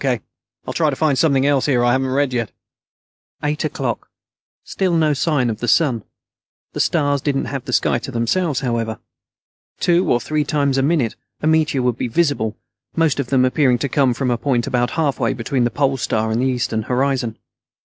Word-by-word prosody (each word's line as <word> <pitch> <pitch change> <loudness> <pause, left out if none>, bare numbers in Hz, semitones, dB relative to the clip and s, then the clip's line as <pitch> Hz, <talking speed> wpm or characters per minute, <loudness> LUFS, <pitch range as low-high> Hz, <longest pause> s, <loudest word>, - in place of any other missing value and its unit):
K. 130 -4 +1 0.5
I'll - - -4
try 155 -2 +2
to 140 - -2
find 150 -1 +2
something 135 -1 +2
else 140 -1 +2
here 125 -4 +2
I 120 - +4
haven't 130 +1 +1
read 135 0 +1
yet." 115 -3 -1 0.9
Eight 150 0 -1
o'clock. 135 -6 -3 0.5
Still 185 -3 -1
no 155 -2 +3
sign 145 -3 +1
of 110 -2 -3
the 120 - -3
sun. 130 -8 +3 0.7
The - - -5
stars 145 -4 +1
didn't 140 -1 -1
have 135 -3 -5
the - - -5
sky - - +2
to - - -7
themselves, 135 +5 0
however. 115 -4 -2 0.8
Two 175 +1 +2
or 120 - +3
three 150 +5 -1
times 140 -2 +1
a - - +3
minute 140 -5 +1 0.3
a - - 0
meteor 155 -4 +2
would 125 -1 0
be - - -1
visible, 120 -5 0 0.4
most 160 -4 +2
of 140 - -1
them 130 -1 +3
appearing 130 -1 +2
to 140 +3 -2
come 130 -3 +2
from 130 -1 -1
a 120 - 0
point 125 -4 0
about 125 -2 0
halfway 150 -4 +1
between 125 +1 -1
the - - +2
Pole 135 +3 0
Star 110 -2 -1
and 115 +2 0
the 130 - +2
eastern 120 -3 -1
horizon. 125 -1 -1
135 Hz, 195 wpm, -20 LUFS, 120-145 Hz, 0.9 s, I